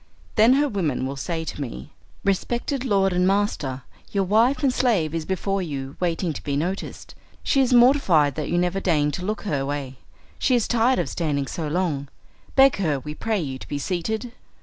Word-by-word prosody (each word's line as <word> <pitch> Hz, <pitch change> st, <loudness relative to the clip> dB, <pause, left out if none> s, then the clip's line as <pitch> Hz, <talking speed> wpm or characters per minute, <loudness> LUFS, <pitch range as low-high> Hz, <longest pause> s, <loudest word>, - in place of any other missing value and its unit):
Then 225 Hz, +3 st, +6 dB
her 290 Hz, +2 st, +3 dB
women 165 Hz, -, -1 dB
will 135 Hz, +1 st, -4 dB
say 160 Hz, +4 st, -3 dB
to 150 Hz, -, -5 dB
me, 70 Hz, -, -7 dB, 0.3 s
"Respected 240 Hz, +7 st, -1 dB
lord 195 Hz, -6 st, +2 dB
and 180 Hz, +1 st, +2 dB
master, 190 Hz, -, 0 dB, 0.3 s
your 200 Hz, -1 st, +1 dB
wife 225 Hz, +9 st, +2 dB
and 265 Hz, -2 st, +3 dB
slave 200 Hz, -, +1 dB
is 165 Hz, -1 st, -2 dB
before 195 Hz, +1 st, -1 dB
you 140 Hz, -5 st, -5 dB
waiting 170 Hz, -1 st, -1 dB
to -, -, -7 dB
be 140 Hz, -1 st, -1 dB
noticed. 180 Hz, +6 st, -4 dB, 0.3 s
She 275 Hz, -, +3 dB
is 260 Hz, -, +2 dB
mortified 240 Hz, -, +5 dB
that 150 Hz, +1 st, -4 dB
you 175 Hz, -, +1 dB
never 180 Hz, +2 st, +1 dB
deign 150 Hz, -6 st, +1 dB
to 180 Hz, -, -5 dB
look 210 Hz, +3 st, -3 dB
her 145 Hz, -9 st, -1 dB
way; 135 Hz, -2 st, -4 dB, 0.4 s
she 255 Hz, -, +3 dB
is 235 Hz, -, +1 dB
tired 240 Hz, +2 st, +3 dB
of -, -, 0 dB
standing 145 Hz, -5 st, -1 dB
so 155 Hz, +4 st, -4 dB
long. 150 Hz, -4 st, -1 dB, 0.5 s
Beg 270 Hz, 0 st, +6 dB
her, 155 Hz, -8 st, 0 dB
we 150 Hz, +3 st, -7 dB
pray 220 Hz, +5 st, -1 dB
you, 135 Hz, -5 st, -4 dB
to -, -, -10 dB
be 145 Hz, -, -3 dB
seated." 215 Hz, -, -3 dB
180 Hz, 195 wpm, -23 LUFS, 145-220 Hz, 0.5 s, Then